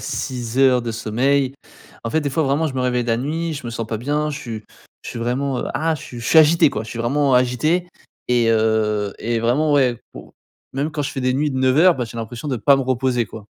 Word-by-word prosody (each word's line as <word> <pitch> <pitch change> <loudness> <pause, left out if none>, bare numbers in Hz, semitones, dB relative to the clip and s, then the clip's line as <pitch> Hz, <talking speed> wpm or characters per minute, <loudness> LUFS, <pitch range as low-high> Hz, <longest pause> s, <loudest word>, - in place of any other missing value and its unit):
6 125 -1 -4
heures 130 -2 +4
de 115 - -3
sommeil. 130 +5 0 0.5
En 115 - -4
fait, 160 - +1
des 145 - -2
fois 160 +4 0
vraiment, 145 +3 +1
je 140 - -5
me 130 - -1
réveille 125 -1 0
la 115 -1 +1
nuit, 160 +6 -2
je 140 -3 -7
me 120 - -4
sens 115 -1 -4
pas 110 -1 -3
bien, 150 +4 -1
je 145 - -5
suis 110 -5 -7 0.4
je - - -7
suis 115 - -6
vraiment, 125 +2 -1
heu, - - -3
ah, 160 +1 0
je 150 - -8
suis 120 - -9
je 115 - -6
suis 160 - +6
agité 155 -1 +5
quoi, - - -4
je 110 - -10
suis 115 - -6
vraiment 135 +3 +1
agité 155 +8 +1 0.4
et 120 -2 +2
heu, 110 -2 +1
et 115 0 -1
vraiment 130 +7 +1
ouais, 130 -5 +2
pour - - -12 0.4
même 140 +4 -2
quand 155 -1 -3
je 145 - -4
fais 135 - -4
des 130 0 +1
nuits 145 +1 0
de 130 - -3
9 130 0 +2
heures, 180 +1 +6
bah, 130 - -3
j'ai 115 - -10
l'impression 115 +5 -6
de 130 - -1
pas 130 +6 +4
me 135 - 0
reposer 130 -2 0
quoi. 105 0 -11
130 Hz, 260 wpm, -20 LUFS, 115-145 Hz, 0.5 s, suis